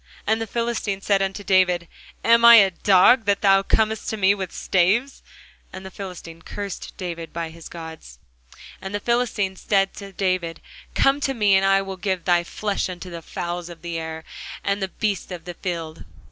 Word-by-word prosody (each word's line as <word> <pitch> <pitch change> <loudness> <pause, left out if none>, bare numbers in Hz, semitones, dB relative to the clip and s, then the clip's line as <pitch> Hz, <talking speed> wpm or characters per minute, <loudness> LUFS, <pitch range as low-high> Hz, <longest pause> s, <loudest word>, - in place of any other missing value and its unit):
And 220 +1 +1
the 225 - -3
Philistine 230 -3 -2
said 195 0 +2
unto 195 +1 -2
David, 180 -3 +2 0.4
Am 230 0 +5
I 235 0 +11
a 200 -4 +7
dog, 200 +6 +5
that 200 0 +1
thou 195 -1 +5
comest 220 +2 0
to 220 - -3
me 195 -1 +4
with 190 -3 -5
staves? 205 +9 +1 0.5
And 190 0 -9
the 190 - -8
Philistine 180 -4 -9
cursed 200 +2 -7
David 170 -3 -6
by 165 -1 -4
his 165 0 -11
gods. 160 - -10 0.6
And 190 +1 -5
the - - -1
Philistine 225 -4 0
said 195 0 +1
to 200 -1 -8
David, 185 -3 -1 0.4
Come 275 +1 +3
to 270 -2 -1
me, 205 -4 +4
and 190 - +3
I 195 0 +3
will 195 -1 -6
give 185 -2 -2
thy 175 -1 +3
flesh 200 +2 -2
unto 180 0 -8
the 170 -1 -7
fowls 175 +1 -5
of 170 -1 -12
the 170 -1 -3
air, 160 0 -6 0.4
and 200 0 -1
to 190 - 0
the - - -27
beasts 205 -4 -2
of 170 -2 -7
the 175 - -6
field. 165 -3 -5
190 Hz, 195 wpm, -23 LUFS, 175-205 Hz, 0.6 s, I